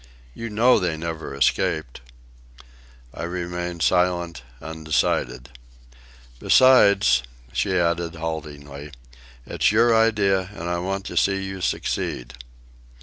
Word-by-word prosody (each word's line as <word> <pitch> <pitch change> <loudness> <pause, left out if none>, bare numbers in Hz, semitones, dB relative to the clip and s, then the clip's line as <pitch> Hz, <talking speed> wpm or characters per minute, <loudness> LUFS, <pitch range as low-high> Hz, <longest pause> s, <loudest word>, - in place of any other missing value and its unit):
You 115 0 -6
know 115 +4 +4
they 85 -4 -2
never 80 -3 -5
escaped." 70 -1 0 1.1
I - - -8
remained 90 0 -4
silent, 90 -4 +1 0.2
undecided. 80 -5 -2 0.9
"Besides," 100 - +5 0.3
she 95 -1 0
added 85 -1 0
haltingly, 75 -3 -7 0.5
"it's - - +1
your 115 +2 +4
idea, 100 -5 +2
and 85 -3 -6
I 85 0 -1
want 95 +2 -3
to - - -6
see 95 0 +2
you 95 -1 -6
succeed." 60 -6 -3
85 Hz, 105 wpm, -23 LUFS, 80-95 Hz, 1.1 s, Besides